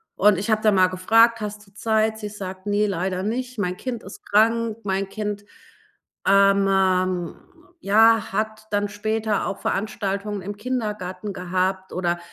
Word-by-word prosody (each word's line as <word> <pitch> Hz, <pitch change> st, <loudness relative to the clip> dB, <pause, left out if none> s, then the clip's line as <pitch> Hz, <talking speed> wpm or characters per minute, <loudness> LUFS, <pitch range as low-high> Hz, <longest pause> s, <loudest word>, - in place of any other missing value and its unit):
und 205 Hz, -1 st, +4 dB
ich 205 Hz, +4 st, -2 dB
habe 215 Hz, 0 st, +2 dB
da 215 Hz, -, +4 dB
mal 185 Hz, -2 st, +5 dB
gefragt: 225 Hz, +5 st, +3 dB
„Hast 210 Hz, 0 st, -6 dB
du 195 Hz, -, -23 dB
Zeit?“ 220 Hz, +1 st, 0 dB
Sie 210 Hz, -1 st, -5 dB
sagt: 190 Hz, -1 st, -8 dB
„Ne, 205 Hz, +1 st, +2 dB
leider 185 Hz, 0 st, -2 dB
nicht. 250 Hz, +4 st, -3 dB
Mein 180 Hz, -2 st, -1 dB
Kind 240 Hz, 0 st, -5 dB
ist 190 Hz, -, -11 dB
krank. 225 Hz, +1 st, +2 dB
Mein 195 Hz, 0 st, -1 dB
Kind, 205 Hz, -1 st, -4 dB, 0.8 s
ähm, 190 Hz, -3 st, +3 dB, 0.4 s
ja, 225 Hz, 0 st, +4 dB
hat 215 Hz, +1 st, -3 dB
dann 205 Hz, 0 st, 0 dB
später 215 Hz, 0 st, -1 dB
auch -, -, -3 dB
Veranstaltungen 205 Hz, 0 st, -2 dB
im 205 Hz, +2 st, -5 dB
Kindergarten 210 Hz, -5 st, -4 dB
gehabt." 185 Hz, +1 st, -2 dB
Oder, 175 Hz, -1 st, -1 dB
205 Hz, 150 wpm, -23 LUFS, 190-215 Hz, 0.8 s, mal